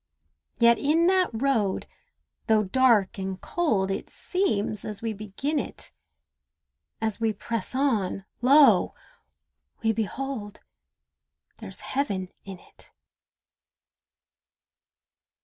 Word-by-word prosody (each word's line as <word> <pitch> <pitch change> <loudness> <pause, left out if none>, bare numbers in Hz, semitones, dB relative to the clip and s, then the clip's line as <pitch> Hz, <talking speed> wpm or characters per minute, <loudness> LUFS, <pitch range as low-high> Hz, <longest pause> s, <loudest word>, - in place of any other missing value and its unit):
Yet 235 0 +5
in 315 +4 +3
that 370 0 +3
road, 225 -5 0 0.6
though 220 -1 +4
dark 215 -2 +3
and 190 0 -4
cold, 215 - 0
It 195 - -4
seems 215 - -1
as 210 0 -6
we 225 -1 -1
begin 215 +9 -3
it, - - -6 1.1
As 220 -1 -2
we 225 -1 +1
press 230 +2 -4
on—lo! 255 +3 +3 0.9
we 225 - +3
behold 220 0 -4 1.0
There's - - -8
Heaven 200 -9 -2
in 195 -1 -8
it. - - -21
225 Hz, 95 wpm, -26 LUFS, 200-275 Hz, 1.1 s, Yet